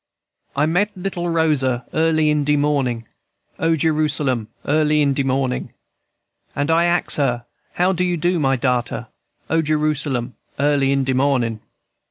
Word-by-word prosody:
"I 145 +2 +2
meet 195 +6 0
little 180 -2 -3
Rosa 140 -7 +1
early 155 -1 +2
in 150 -1 +1
de 150 +1 +2
mornin', 140 -6 0 0.5
O 165 0 +2
Jerusalem! 150 -6 0 0.2
early 150 +1 +2
in 140 -2 +3
de 140 - 0
mornin'; 130 -1 -1 0.8
And 145 +2 0
I 165 +1 +3
ax 175 0 +3
her, 120 -4 0 0.3
How 180 +2 +2
you 180 -1 0
do, 175 +2 +1
my 135 -2 +2
darter? 125 -2 -1 0.4
O 165 0 +2
Jerusalem! 150 -5 -1 0.2
early 140 -1 +2
in 140 0 +1
de 130 0 0
mornin'. 130 -4 +1
145 Hz, 145 wpm, -20 LUFS, 130-160 Hz, 0.8 s, in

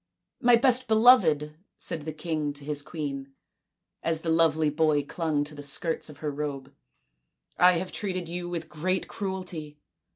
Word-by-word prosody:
" - - -48
My 240 - +9
best 255 +1 +3
beloved," 215 - +5 0.2
said 155 -3 -4
the 160 - -3
king 155 -2 -3
to 145 0 -10
his 150 -1 -3
queen, 140 -3 -6 0.7
as 160 -1 0
the 165 - -1
lovely 160 -2 +3
boy 150 -1 +2
clung 155 -1 -1
to 150 +1 -8
the 145 - -8
skirts 155 +4 -1
of 150 - -11
her 150 - 0
robe, 140 -1 -5 0.5
" - - -52 0.3
I 180 0 +7
have 180 +2 -2
treated 185 -4 -3
you 175 +1 -4
with 170 -2 -4
great 185 +4 -2
cruelty. 180 -7 -5
160 Hz, 170 wpm, -27 LUFS, 145-180 Hz, 0.7 s, My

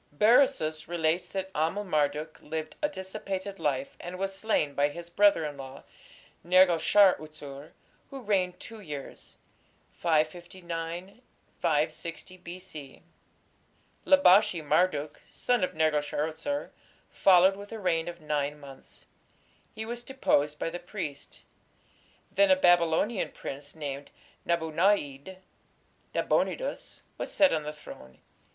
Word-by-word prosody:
Berosus 160 - +3
relates 170 0 0
that 190 -1 -4
Amel 165 +7 0
Marduk 150 -3 -1
lived 155 0 -5
a 295 - +1
dissipated 190 -3 -5
life, 140 -2 -1
and 180 +1 -7
was 195 +1 -2
slain 195 -8 0
by 145 +1 +2
his 170 +3 -9
brother 200 -4 +4
in 145 -2 -5
law, 135 0 -9 0.6
Nergal 180 0 +5
shar 195 +3 +6
utsur, 150 -1 -10 0.4
who 275 - -7
reigned 190 -6 0
two 225 -1 -10
years 150 -8 -9 0.5
(559 170 +4 -2 0.7
6 165 +1 -8 0.2
B.C.). 170 -6 -9 1.0
Labashi 195 - +5
Marduk, 150 -1 +1
son 245 -5 0
of 180 - -1
Nergal 155 -1 +2
shar 145 0 -2
utsur, 285 - -4 0.4
followed 190 0 +5
with 200 +1 -11
a 225 - -5
reign 175 -5 0
of 175 0 -6
nine 150 -1 -2
months. 135 -2 -13 0.7
He 220 - -4
was 240 +1 -4
deposed 150 - +1
by 165 - -3
the 175 - -5
priests. 175 -5 -7 0.9
Then 300 -1 +4
a 280 - +7
Babylonian 175 - +3
prince 140 +2 -8
named 145 -2 -6 0.4
Nabu 170 -2 0
na´id 170 -2 +1 0.8
(Nabonidus) - - -1 0.2
was - - -3
set 290 -2 +4
on 155 - 0
the 150 0 -5
throne. 65 - -13
170 Hz, 125 wpm, -28 LUFS, 150-195 Hz, 1.0 s, a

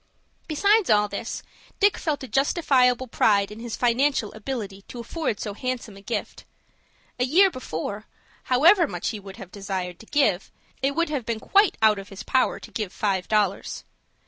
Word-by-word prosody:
Besides 400 +6 +3
all 210 -1 +4
this, 205 +3 -5 0.4
Dick 405 0 +4
felt 300 -4 -2
a - - -6
justifiable 260 -3 +2
pride 205 -3 +2
in 210 - -9
his 235 -1 -5
financial 245 -1 +1
ability 215 -3 -5
to 245 - -9
afford 235 -2 -3
so 210 - -4
handsome 245 -2 -4
a 195 - -13
gift. 220 +4 -4 0.8
A - - +3
year 365 +9 +5
before, 205 - -5 0.4
however 330 +8 +5
much - - -3
he 215 - -5
might 195 -1 -11
have 190 -2 -10
desired 190 -3 -4
to 225 - -14
give, 270 -11 +1 0.3
it 275 +1 0
would 335 0 +1
have 285 -5 -2
been 230 -2 -1
quite 400 - +3
out 215 -2 +5
of 195 - -10
his 195 0 -9
power 260 -1 +1
to - - -12
give 210 -5 -3
five 195 -3 -1
dollars. 205 -3 0
235 Hz, 175 wpm, -25 LUFS, 205-280 Hz, 0.8 s, year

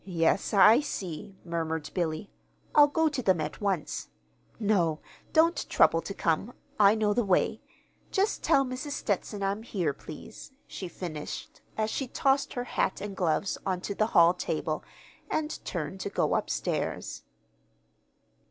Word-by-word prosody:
"Yes, 170 -1 +1
I 215 +4 +7
see," 195 - -5
murmured 160 -2 -3
Billy. 170 +1 -2 0.4
"I'll 295 -1 +8
go 320 +2 +2
to 290 -4 -1
them 190 -7 +3
at 150 +5 -4
once. 195 -6 -2 0.5
No, 180 -8 +2 0.3
don't 330 +2 +3
trouble 165 - +4
to 195 - -6
come. 170 +8 0 0.3
I 205 +1 +7
know 215 -1 +2
the 240 - +2
way. 190 -3 +1 0.5
Just 395 +2 +1
tell 275 0 +4
Mrs. 255 +3 -4
Stetson 205 -3 -2
I'm 200 +2 -1
here, 180 -10 -1
please," 155 - -11
she 185 - -6
finished, 160 -4 -7 0.2
as 215 0 0
she 270 - -2
tossed 270 +2 +1
her 245 - -2
hat 220 - -1
and 200 -1 -5
gloves 180 +2 0
on 185 -2 -1
to 200 - -3
the 215 +2 +1
hall 170 0 +8
table, 180 - -2 0.5
and 310 0 -2
turned 170 +1 -4
to 200 - -3
go - - +1
upstairs. - - -2
200 Hz, 150 wpm, -29 LUFS, 170-240 Hz, 0.5 s, I'll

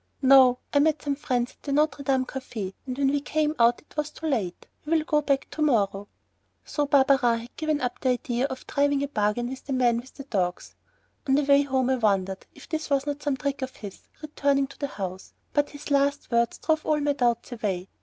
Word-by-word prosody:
"No, 260 -2 +7 0.2
I 285 - +5
met 310 +1 +2
some 285 - 0
friends 250 -4 -1
at - - -28
the 285 - -5
Notre 300 +1 +1
Dame 265 -2 +1
café 225 -8 -6
and 255 0 -4
when 275 -1 +2
we 285 0 0
came 305 +1 0
out 235 +1 +4
it - - -24
was 300 0 -1
too 320 - -9
late. 220 - -2 0.2
So 300 - -9
we'll 320 -1 +3
go 300 -1 +1
back 275 -2 0
to 310 - -5
morrow." 205 -8 +1 0.6
So 290 -1 -1
Barberin 265 -4 +4
had 235 - -13
given 310 -2 -1
up 250 -1 -2
the 260 - +1
idea 250 0 0
of 260 -2 -6
driving 285 0 +1
a - - -1
bargain 215 -2 0
with 260 0 -7
the 275 - -3
man 245 -2 +3
with 255 +3 -13
the 275 - -8
dogs. 185 -9 -2 0.5
On 270 - +4
the 290 - +3
way 280 0 +5
home 265 -2 0
I 260 - +2
wondered 195 -4 0
if - - -14
this 315 -1 -3
was 275 -1 +1
not 290 0 -3
some 285 -2 -1
trick 280 +1 -3
of 260 0 -5
his, 200 -3 -9 0.2
returning 280 -2 +1
to - - -15
the 285 - -1
house, 190 -6 -6 0.2
but 290 -1 +2
his 290 0 -9
last 280 0 +1
words 235 0 +1
drove 315 -1 0
all 305 -1 +1
my 290 0 +1
doubts 240 -3 0
away. 195 -6 -3
270 Hz, 230 wpm, -26 LUFS, 240-290 Hz, 0.6 s, No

